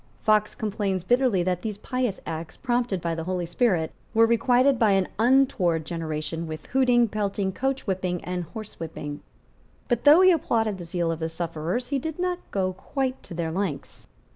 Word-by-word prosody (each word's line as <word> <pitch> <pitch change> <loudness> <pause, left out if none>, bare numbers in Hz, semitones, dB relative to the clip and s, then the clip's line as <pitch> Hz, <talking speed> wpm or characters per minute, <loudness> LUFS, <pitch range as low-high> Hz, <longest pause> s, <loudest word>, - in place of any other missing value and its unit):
Fox 215 -1 +3
complains 200 -3 -2
bitterly 245 -3 +2
that 180 0 -1
these 215 -3 -4
pious 250 -2 -2
acts, 160 0 -6
prompted 240 -7 0
by 170 0 -1
the 165 0 -4
Holy 180 -1 -2
Spirit, 175 -3 +1 0.2
were 225 +1 +7
requited 245 +3 +3
by 215 -3 +4
an 195 -1 +2
untoward 225 - +3
generation 165 0 -4
with 155 -1 -7
hooting, 245 -2 +3
pelting, 200 -2 -1
coachwhipping 190 -9 -1
and 180 -1 -3
horsewhipping. 165 -8 -6 0.7
But, 240 -2 0
though 300 +5 +8
he 370 0 +7
applauded 225 - +1
the 175 - -6
zeal 170 0 -1
of 165 - -4
the 160 0 -2
sufferers, 170 +7 -3
he 280 -1 0
did 320 +3 -5
not 360 0 -1
go 185 -2 -1
quite 260 +7 -3
to 170 - -10
their 165 -1 -2
lengths. 170 -5 -4
195 Hz, 170 wpm, -25 LUFS, 170-245 Hz, 0.7 s, though